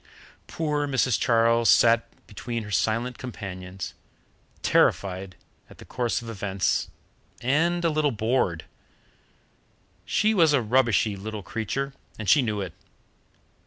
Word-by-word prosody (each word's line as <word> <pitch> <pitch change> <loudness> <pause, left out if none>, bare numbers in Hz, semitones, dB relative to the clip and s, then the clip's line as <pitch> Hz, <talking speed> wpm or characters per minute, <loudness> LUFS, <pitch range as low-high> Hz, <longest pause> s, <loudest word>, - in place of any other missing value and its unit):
Poor 150 -2 -1
Mrs. 130 -3 +1
Charles 115 0 +3
sat 115 0 +5 0.2
between 115 +2 -5
her 105 - -9
silent 115 +4 0
companions, 95 -6 -7 0.7
terrified 95 -1 +1 0.3
at - - -15
the - - -13
course 120 -1 -2
of - - -9
events, 100 -3 -1 0.5
and 170 +7 +1
a - - +4
little 150 -1 +2
bored. 110 - 0 1.4
She 215 +1 +1
was 165 -7 +4
a 140 - +4
rubbishy 115 -3 +2
little 105 +1 -6
creature, 135 +7 -3 0.2
and 110 - -6
she 140 - +6
knew 105 -4 -2
it. 90 -4 -5
115 Hz, 125 wpm, -25 LUFS, 105-130 Hz, 1.4 s, she